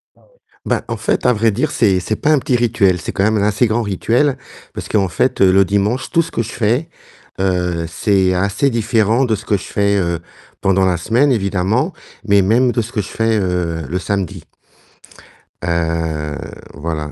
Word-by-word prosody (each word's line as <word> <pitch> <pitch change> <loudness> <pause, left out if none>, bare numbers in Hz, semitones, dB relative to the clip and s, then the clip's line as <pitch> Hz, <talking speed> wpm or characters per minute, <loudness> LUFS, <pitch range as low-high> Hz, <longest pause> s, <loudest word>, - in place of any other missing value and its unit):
Ah - - -27
ouais. - - -29 0.3
Bah, - - 0
en - - -2
fait - - -1
à 125 - +5
vrai 115 0 +2
dire, 130 +10 -1
c'est 95 -6 +2
c'est 110 +4 -2
pas 155 - +1
un 150 - +4
petit 125 - 0
rituel, 110 -6 +2
c'est - - -5
quand 95 - 0
même 110 +1 +2
un 100 - +1
assez 105 +4 +2
grand 110 +2 0
rituel, 120 +7 +1 0.4
parce - - -6
qu'en 100 -3 +2
fait, 85 - 0
heu, 95 -1 +6
le 95 +1 +5
dimanche, 100 +6 0
tout 170 - +4
ce - - -6
que - - -1
je 115 - -8
fais, 120 +8 0 0.5
heu, 90 -3 0
c'est 95 +2 +1
assez 100 +9 +1
différent 115 +1 +1
de 110 - +1
ce - - -9
que 100 - +1
je - - -9
fais, 100 0 0
heu, 85 -3 -1 0.4
pendant 95 0 +2
la 90 -2 +1
semaine 120 - +2
évidemment, 105 - 0 0.3
mais 100 -1 +4
même 120 +6 +3
de 120 - +1
ce 115 +2 -7
que 110 - -1
je 100 - -8
fais, 115 0 0
heu, 90 -4 -2
le 90 +3 -1
samedi 95 -2 -3 1.2
heu, 80 -3 -2 0.4
voilà. 75 -2 -3
100 Hz, 205 wpm, -17 LUFS, 90-115 Hz, 1.2 s, heu